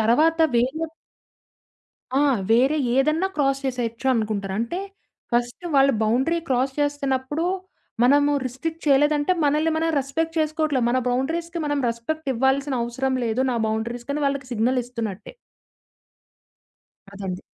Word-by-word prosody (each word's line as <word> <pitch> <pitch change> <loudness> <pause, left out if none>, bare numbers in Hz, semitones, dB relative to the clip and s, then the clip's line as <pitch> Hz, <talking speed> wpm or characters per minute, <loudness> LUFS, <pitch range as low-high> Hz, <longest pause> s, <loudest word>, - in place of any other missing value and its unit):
తర్వాత 305 +9 +3 0.2
వేరే 265 +7 +1 1.3
ఆ! - - +3 0.3
వేరే 260 +6 +4 0.2
ఏదన్నా 305 +7 +2
క్రాస్ 275 -2 +1
చేసేయొచ్చు 245 -1 -3
అనుకుంటారు. 210 -3 -2
అంటే 235 +11 -2 0.5
ఫస్ట్ 240 +7 -1
వాళ్ళు 275 0 +5
బౌండరీ 260 +10 +2
క్రాస్ 260 +1 +1
చేస్తన్నప్పుడు 290 +1 -1 0.6
మనము 285 +3 +4
రిస్ట్రిక్ట్ 315 +6 -5
చేయలేదంటే, 295 +3 +3
మనల్ని 300 +3 +2
మనం 325 +1 +1
రెస్పెక్ట్ 325 +5 -3
చేసుకోవట్లే. 310 -3 +1
మన 250 +2 +2
బౌండరీస్‌కి 330 +7 -1
మనం 290 -1 0
రెస్పెక్ట్ 275 +7 -4
ఇవ్వాల్సిన 265 +3 +1
అవసరం 260 +2 -1
లేదు. 230 +2 0
నా 240 - -1
బౌండరీ‌స్‌కని 240 +6 -3
వాళ్ళకి 275 -1 -2
సిగ్నలిస్తున్నట్టే. 230 - -2 1.8
అదండి. 190 -2 -5
270 Hz, 115 wpm, -23 LUFS, 240-300 Hz, 1.8 s, వాళ్ళు